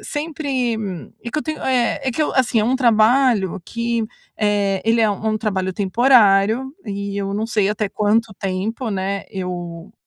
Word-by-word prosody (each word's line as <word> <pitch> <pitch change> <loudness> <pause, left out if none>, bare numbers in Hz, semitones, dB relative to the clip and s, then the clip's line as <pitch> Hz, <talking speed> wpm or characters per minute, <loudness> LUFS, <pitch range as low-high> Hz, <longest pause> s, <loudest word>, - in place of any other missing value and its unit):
sempre, 285 -6 -2 0.5
e 235 - -5
que 305 - -1
eu - - -2
tenho 310 -1 -4
eh, 250 -1 +1
é 260 - 0
que 260 - -4
eu - - -1
Assim 245 -4 +2
é 215 - +2
um 250 +3 +2
trabalho 230 -5 +3
que, 235 -1 -2 0.3
eh, 205 -2 +1
ele 230 +1 +3
é 220 - +4
u 205 - 0
um 215 +1 -2
trabalho 190 -3 -1
temporário 220 - +3
e 200 -1 -4
eu 195 0 -2
não 215 +2 -1
sei 210 -3 +1
até 210 -1 -1
quanto 210 +1 +1
tempo, 205 +6 -3
né, 195 0 -2
eu, 180 -1 -6
220 Hz, 180 wpm, -20 LUFS, 195-245 Hz, 0.5 s, é